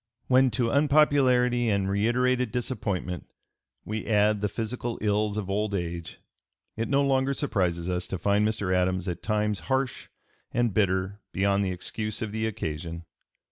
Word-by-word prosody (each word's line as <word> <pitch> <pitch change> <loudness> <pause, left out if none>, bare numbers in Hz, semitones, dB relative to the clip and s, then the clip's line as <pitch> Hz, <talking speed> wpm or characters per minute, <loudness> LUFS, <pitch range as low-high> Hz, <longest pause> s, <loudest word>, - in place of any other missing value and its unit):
When 130 0 +4
to 115 -2 +1
unpopularity 135 -5 +4
and 100 -2 +1
reiterated 120 +4 +1
disappointment 100 -8 -3 0.6
we 110 +1 -4
add 105 -1 +3
the 105 - 0
physical 115 +2 -4
ills 105 0 0
of 105 -3 -3
old 100 +1 -1
age, 85 -2 -4 0.6
it 115 +1 -2
no 140 0 +3
longer 135 0 +2
surprises 90 - -1
us 90 -1 -2
to 95 - -3
find 100 +3 +2
Mr. 105 -3 0
Adams 90 0 0
at 90 -1 -3
times 105 -2 0
harsh 130 -1 -1 0.4
and 120 -3 +1
bitter 95 0 +1
beyond 100 +1 +2
the 95 - 0
excuse 105 +5 -3
of 110 - -4
the 110 +1 -1
occasion. 85 -4 -5
105 Hz, 150 wpm, -27 LUFS, 95-120 Hz, 0.6 s, When